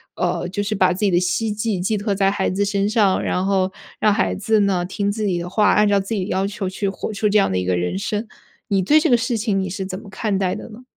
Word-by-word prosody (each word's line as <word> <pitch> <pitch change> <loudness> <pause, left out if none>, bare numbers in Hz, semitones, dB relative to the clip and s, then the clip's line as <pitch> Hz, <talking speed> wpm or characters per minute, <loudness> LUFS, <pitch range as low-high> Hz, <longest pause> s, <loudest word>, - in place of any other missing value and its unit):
呃 175 0 -1
就 195 +3 -2
是 210 +1 -2
把 185 -2 +3
自 180 - -7
己 210 -2 +2
的 175 -2 +3
希 185 +5 0
冀 210 -2 -2
寄 200 +4 0
托 205 0 -1
在 195 0 +2
孩 195 -1 -1
子 195 +2 0
身 200 0 0
上， 210 -3 +2
然 180 - 0
后 190 -1 +1 0.3
让 215 - +3
孩 95 - 0
子 220 - +1
呢 190 -3 +1
听 200 +2 -2
自 215 +1 -3
己 180 -3 0
的 170 +1 -5
话， 210 +3 +3
按 210 0 +4
照 200 -1 +3
自 195 +3 -4
己 195 -4 -1
的 - - -8
要 190 +1 0
求 200 -1 -3
去 195 +2 -3
活 195 +2 -4
出 210 +1 0
这 210 +1 +4
样 195 - +2
的 95 - 0
一 90 - -1
个 90 0 +1
人 90 - -1
生。 210 +2 -3 0.4
你 195 -2 +1
对 295 +12 +5
这 - - +1
个 245 - +5
事 235 0 -1
情 210 -3 0
你 190 -1 -2
是 190 +1 -4
怎 185 0 -5
么 205 - -13
看 195 +1 -2
待 185 -2 0
的 - - -8
呢？ 230 +3 -12
200 Hz, 315 characters per minute, -21 LUFS, 185-210 Hz, 0.4 s, 对